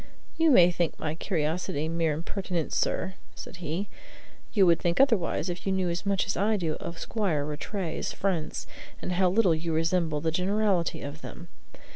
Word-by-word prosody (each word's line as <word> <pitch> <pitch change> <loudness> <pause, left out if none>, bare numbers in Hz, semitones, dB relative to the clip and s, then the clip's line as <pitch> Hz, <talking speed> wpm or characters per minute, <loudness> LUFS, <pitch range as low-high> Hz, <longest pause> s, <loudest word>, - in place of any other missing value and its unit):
"You 325 -1 +4
may 180 - +7
think 170 -1 -1
my 155 - -2
curiosity 160 -2 -1
mere 165 -1 +1
impertinence, 170 +1 -3
sir," 190 - 0 0.2
said - - -9
he; 175 +4 -3 0.6
"you 200 -4 +5
would 170 -2 +5
think 170 0 0
otherwise 215 - +3
if 175 -1 -4
you - - +2
knew 185 -2 +1
as 175 +3 -4
much 195 -1 +2
as 200 - -2
I 210 +3 +2
do 165 -5 -1
of 170 - -6
Squire 175 -11 -1
Rattray's 160 +4 -3
friends, 180 -6 -2 0.3
and - - -4
how 180 +1 +3
little 190 -2 +4
you 160 +1 -2
resemble 165 -1 +1
the 160 +2 0
generality 190 0 +1
of 145 +2 -7
them. 170 0 -9
175 Hz, 175 wpm, -28 LUFS, 160-195 Hz, 0.6 s, may